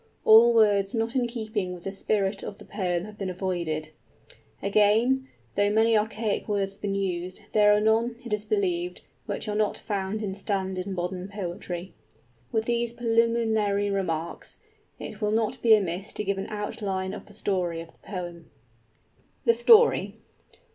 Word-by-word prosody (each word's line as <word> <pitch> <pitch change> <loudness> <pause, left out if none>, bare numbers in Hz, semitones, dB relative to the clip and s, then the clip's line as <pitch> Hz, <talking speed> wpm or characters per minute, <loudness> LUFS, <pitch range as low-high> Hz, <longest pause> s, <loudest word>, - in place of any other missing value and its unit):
All 230 +2 +8
words 205 -2 +4
not 225 +2 -1
in 250 -2 +2
keeping 220 -5 -3
with 175 - -12
the 195 - -3
spirit 195 0 -1
of 200 - -7
the - - -13
poem 180 -3 -2
have 210 0 -12
been 195 -2 -2
avoided. 170 -4 -3 0.7
Again, 220 +6 +3 0.3
though 205 +1 +2
many 220 +2 +3
archaic 215 0 -1
words 200 -2 0
have 195 - -23
been 200 -1 -1
used, 185 -1 -3
there 210 -1 +5
are 210 - +5
none, 225 +2 +2
it 230 - -3
is 210 0 -1
believed, 360 - -1 0.3
which - - -4
are 210 - -1
not 210 0 +1
found 205 +1 -3
in 195 -2 -2
standard 190 -2 -2
modern 180 0 -3
poetry. 180 -2 -5 0.2
[ix] - - -30 0.3
With 220 0 0
these 235 0 0
preliminary 225 -3 +1
remarks, 170 -4 -3 0.4
it - - -8
will 210 - +1
not 220 0 0
be 225 -2 +7
amiss 190 0 -2
to - - -3
give 195 -1 -1
an 195 - -4
outline 200 -2 -3
of - - -9
the 205 - -15
story 180 -5 -1
of 165 0 -8
the - - -31
poem. 175 -4 -7 1.0
_THE 465 - +6
STORY. 470 -1 +5
205 Hz, 170 wpm, -26 LUFS, 190-220 Hz, 1.0 s, All